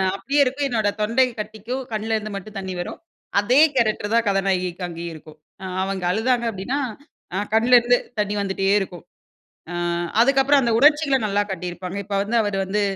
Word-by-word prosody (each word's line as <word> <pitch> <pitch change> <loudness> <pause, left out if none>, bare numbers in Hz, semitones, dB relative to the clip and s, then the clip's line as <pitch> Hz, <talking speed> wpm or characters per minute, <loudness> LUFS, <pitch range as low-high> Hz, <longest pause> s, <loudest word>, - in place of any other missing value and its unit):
அப்பியே 275 +9 +1
இருக்கும் 275 +2 -1
என்னோட 220 -4 +1
தொண்டயும் 235 +2 +1
கட்டிக்கும். 220 +5 -5
கண்லருந்து 215 -1 -2
மட்டும் 200 +1 -8
தண்ணி 190 -1 -5
வரும். 175 - -5 0.4
அதே 245 +7 +3 0.2
கேரக்டரு 215 -3 +1
தான் 235 0 +3
கதாநாயகிக்கு 185 -2 0
அங்கேயும் 170 0 -6
இருக்கும். 155 0 -14 0.3
அ - - -5 0.2
அவங்க 195 -1 -3
அழுதாங்க 235 +3 +1
அப்படின்னா, 225 +8 -3 0.6
அ - - 0 0.2
கண்லருந்து 245 +1 +5 0.2
தண்ணி 205 0 -2
வந்துட்டே 195 0 -1
இருக்கும். 180 -3 -7 0.7
அ - - -5 0.5
அதுக்கப்புறம் 270 +2 +4
அந்த 235 - +1
உணர்ச்சிகள 295 -1 +4
நல்லா 205 0 +1
கட்டியிருப்பாங்க. 180 +1 -5
இப்ப 205 - -3
வந்து 215 +4 -2
அவரு 205 -2 -2
வந்து, 205 +2 -1
210 Hz, 155 wpm, -22 LUFS, 195-245 Hz, 0.7 s, கண்லருந்து